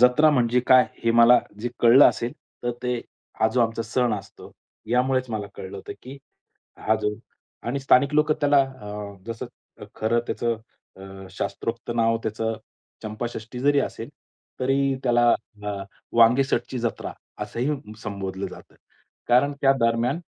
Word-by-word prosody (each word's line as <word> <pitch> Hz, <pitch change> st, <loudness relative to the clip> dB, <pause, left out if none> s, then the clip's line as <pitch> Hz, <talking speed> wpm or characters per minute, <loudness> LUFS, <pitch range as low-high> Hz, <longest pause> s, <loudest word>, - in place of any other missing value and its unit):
जत्रा 125 Hz, +5 st, +6 dB
म्हणजे 125 Hz, -3 st, +2 dB
काय 130 Hz, -1 st, +7 dB, 0.2 s
हे 115 Hz, -, +4 dB
मला 115 Hz, +1 st, +7 dB, 0.2 s
जे 120 Hz, -, -2 dB
कळलं 120 Hz, +4 st, +8 dB
असेल, 120 Hz, +1 st, -3 dB, 0.3 s
तर 120 Hz, -, 0 dB
ते 125 Hz, 0 st, 0 dB, 0.4 s
हा 110 Hz, -, +4 dB
जो 125 Hz, -, +2 dB
आमचा 115 Hz, 0 st, +1 dB
सण 120 Hz, +1 st, 0 dB
असतो 100 Hz, -1 st, -10 dB, 0.4 s
यामुळेच 130 Hz, +1 st, +1 dB
मला 105 Hz, -2 st, -3 dB
कळलं 95 Hz, +1 st, -8 dB
होतं -, -, -7 dB
की 130 Hz, +2 st, -9 dB, 0.7 s
हा 110 Hz, -, +4 dB
जो 105 Hz, 0 st, -1 dB, 0.5 s
आणि 130 Hz, +4 st, -1 dB
स्थानिक 135 Hz, +2 st, +4 dB
लोक 150 Hz, +1 st, +4 dB
त्याला 145 Hz, -1 st, +3 dB
अ, 105 Hz, -6 st, -5 dB
जसं 115 Hz, -1 st, -5 dB, 0.5 s
खरं 115 Hz, +2 st, +1 dB
त्याचं 115 Hz, -1 st, -1 dB, 0.4 s
अ, 95 Hz, 0 st, -10 dB
शास्त्रोक्त 115 Hz, +5 st, -4 dB
नाव 115 Hz, -1 st, +2 dB
त्याचं 110 Hz, +1 st, -2 dB, 0.5 s
चंपाषष्ठी 110 Hz, +2 st, -6 dB
जरी 145 Hz, +1 st, +3 dB
असेल, -, -, -4 dB, 0.5 s
तरी 135 Hz, +1 st, +2 dB
त्याला 120 Hz, -1 st, +4 dB, 0.3 s
अ, 105 Hz, 0 st, -3 dB, 0.4 s
वांगेसटची 125 Hz, +2 st, +3 dB
जत्रा 120 Hz, -1 st, -3 dB, 0.3 s
असंही 125 Hz, -3 st, -3 dB
संबोधलं 100 Hz, -2 st, -4 dB
जातं. -, -, -12 dB, 0.5 s
कारण 125 Hz, +4 st, +4 dB
त्या 135 Hz, -1 st, +5 dB
दरम्यान 115 Hz, +7 st, +1 dB
120 Hz, 140 wpm, -24 LUFS, 110-130 Hz, 0.7 s, कळलं